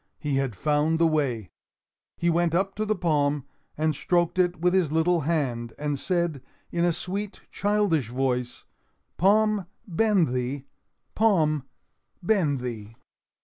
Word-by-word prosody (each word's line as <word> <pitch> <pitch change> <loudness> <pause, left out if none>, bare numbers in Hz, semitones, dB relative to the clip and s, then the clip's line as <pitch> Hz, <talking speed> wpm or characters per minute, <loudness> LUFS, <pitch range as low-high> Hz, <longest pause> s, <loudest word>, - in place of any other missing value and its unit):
He 145 -2 -1
had 135 -5 -1
found 150 +6 +1
the 165 - +3
way. 135 - 0 0.7
He 170 - -1
went 170 0 +1
up 195 +2 +1
to 215 +1 -3
the 215 - +1
palm 150 -6 +1 0.3
and 155 +1 +1
stroked 175 +4 +1
it 180 -2 +2
with 180 +2 +2
his 180 -6 +2
little 165 +2 +2
hand, 135 -7 -1
and 145 -2 -2
said, 170 -6 -1 0.3
in 170 0 0
a 175 - +4
sweet, 200 +5 -4
childish 200 - +1
voice: 125 -1 -2 0.5
"Palm, 210 0 +3 0.2
bend 195 - +2
thee! 130 +2 -2 0.5
Palm, 155 - +2 0.6
bend 170 - +2
thee!" 115 -3 -6
160 Hz, 140 wpm, -26 LUFS, 140-180 Hz, 0.7 s, a